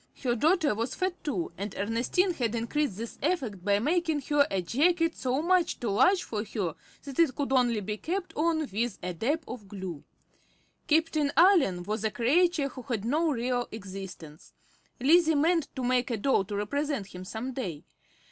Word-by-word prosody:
Her 245 -2 +2
daughter 315 - +3
was 230 +4 -3
fat, 370 -1 -2
too, 335 +3 -2
and 200 0 -4
Ernestine 235 - +1
had 235 -7 -1
increased 235 0 -1
this 230 +1 -7
effect 260 - -1
by 200 +1 +3
making 315 - +1
her 290 -1 +4
a 195 - 0
jacket 330 - +2
so 260 +3 -1
much 360 0 +2
too 235 - -2
large 365 - +4
for 210 -2 -3
her 200 -6 -3 0.3
that 275 0 -7
it 310 -7 +4
could 280 -2 -2
only 240 -4 +3
be 210 +2 -4
kept 365 - -4
on 315 -1 +1
with 230 +2 -1
a 180 - -3
dab 285 - -1
of 230 -5 -8
glue. 185 -6 -7 0.8
Captain 310 -2 +2
Allen 320 - +5
was 210 +3 -3
a 220 - +2
creature 290 +6 +2
who 255 - -9
had 225 -3 -3
no 310 +7 +2
real 245 -2 -1
existence. 190 -7 -9 0.5
Lizzie 320 +4 +5
meant 325 +1 +2
to 260 - -3
make 250 +1 +1
a 235 - -1
doll 210 -3 +2
to 205 +1 -5
represent 275 +3 -1
him 180 0 -7
some 225 +7 -5
day. 180 - -5
255 Hz, 180 wpm, -28 LUFS, 210-315 Hz, 0.8 s, Allen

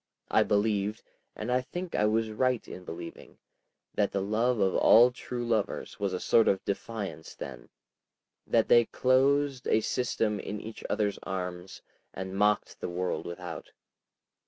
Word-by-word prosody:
I - - +5
believed, 105 0 +1 0.3
and 110 +3 -4
I 125 +1 +3
think 175 +7 -6
I 105 - +2
was 110 +1 +1
right 125 +2 0
in 90 - -9
believing, 85 0 -9 0.6
that 100 - +1
the 100 - -1
love 115 +4 +1
of 95 -2 +2
all 120 +2 +7
true 125 -1 -5
lovers 110 -3 -1
was 100 -1 0
a 90 - -2
sort 115 - +4
of 95 - +1
defiance 100 -6 -5
then, - - -8 0.8
that - - +3
they 120 -1 +6
closed 135 +2 +2
a - - +4
system 110 -3 0
in 105 +1 -5
each 110 +1 -9
other's 105 -1 0
arms 90 -1 -5 0.3
and 95 0 -5
mocked 105 +1 +1
the - - -4
world 90 +1 -2
without. 85 -1 -7
105 Hz, 155 wpm, -29 LUFS, 95-120 Hz, 0.8 s, all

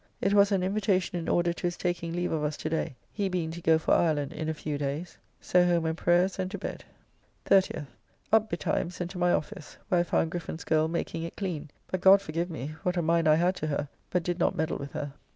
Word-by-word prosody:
It 200 - +1
was 200 0 +5
an 190 -2 +2
invitation 190 -2 0
in 165 - -4
order 175 0 +2
to 175 - -2
his 175 - -4
taking 175 -1 -2
leave 175 +1 -1
of 155 -2 -1
us 150 0 -1
to 155 - -3
day, 160 -4 -1 0.2
he 200 -2 -1
being 175 -3 -2
to 170 +1 -7
go 160 -1 +4
for 160 - +1
Ireland 150 -4 +2
in 160 - -3
a - - 0
few 150 -1 -4
days. 145 +4 -4 0.2
So 180 0 +3
home 175 -2 +2
and 160 0 0
prayers, 175 +3 +2
and 185 0 -1
to - - -5
bed. - - -6 0.6
30th. 190 -6 +3 0.5
Up 220 0 +5
betimes, 170 +1 -2
and 175 0 -3
to 185 - -7
my 175 0 +3
office, 150 -2 -3
where 180 - +3
I - - +4
found 165 -1 0
Griffen's 170 -2 -5
girl 155 0 +2
making 165 0 -3
it 165 - -6
clean, 165 -7 -4 0.2
but, 185 - -3
God 195 +1 +8
forgive 170 -1 -3
me! 155 -2 -5
what 180 0 -1
a 175 - +1
mind 165 0 +2
I 155 - +6
had 175 +3 +2
to 155 - -3
her, 145 -1 -2 0.2
but 180 -1 0
did 175 +1 -2
not - - +2
meddle 160 0 -1
with 140 0 -7
her. 145 -2 -4
170 Hz, 245 wpm, -28 LUFS, 155-180 Hz, 0.6 s, God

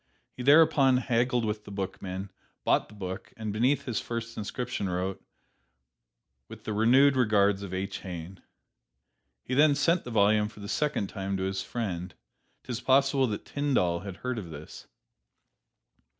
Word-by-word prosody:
He - - -7
thereupon 140 -1 +5
haggled 120 -1 +1
with 105 0 -3
the - - -12
bookman, 95 0 -5 0.3
bought - - +2
the - - -14
book 95 -2 -6
and 110 -2 -4
beneath 130 +6 +1
his 120 -5 -2
first 115 0 -5
inscription 110 -1 -3
wrote, 90 +2 -3 1.3
"With - - -11
the 110 - -3
renewed 130 +6 +5
regards 105 -5 +3
of 100 -3 -6
H. 95 +1 -3
Heine." 90 0 -8 1.0
He 130 - -4
then 145 +2 +5
sent 165 +4 +2
the - - -7
volume 105 -1 +3
for 105 - -13
the 100 - -7
second 150 -3 0
time 95 -1 -4
to 95 - -2
his 95 0 -2
friend. 95 -6 -4 0.5
'T - - -7
is 120 +1 -3
possible 135 +1 +3
that 105 -2 -4
Tyndall 130 -13 0
had 95 0 -8
heard 125 -2 -1
of 90 -5 -8
this. 75 -1 -10
110 Hz, 160 wpm, -28 LUFS, 95-130 Hz, 1.3 s, thereupon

